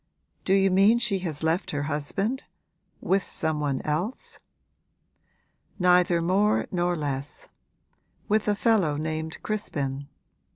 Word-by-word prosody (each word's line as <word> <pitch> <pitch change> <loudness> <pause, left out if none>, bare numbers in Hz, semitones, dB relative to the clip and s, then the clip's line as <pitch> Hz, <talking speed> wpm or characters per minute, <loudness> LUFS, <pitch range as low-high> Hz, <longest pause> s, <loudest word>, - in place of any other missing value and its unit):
'Do 190 - +2
you 195 -1 +3
mean 200 +5 +5
she 235 -5 +1
has 160 -5 -4
left 165 +4 0
her 145 -1 -2
husband 155 - -2 0.6
with 195 +1 +2
some 160 -4 -1
one 140 -3 -1
else?' 175 +11 -2 1.4
'Neither 180 -2 +4
more 200 +5 +2
nor 175 -1 +1
less; 145 -2 -4 0.8
with 215 0 +1
a 205 - +3
fellow 200 -9 +2
named 160 +1 -3
Crispin. 140 -10 -3
175 Hz, 120 wpm, -26 LUFS, 150-200 Hz, 1.4 s, mean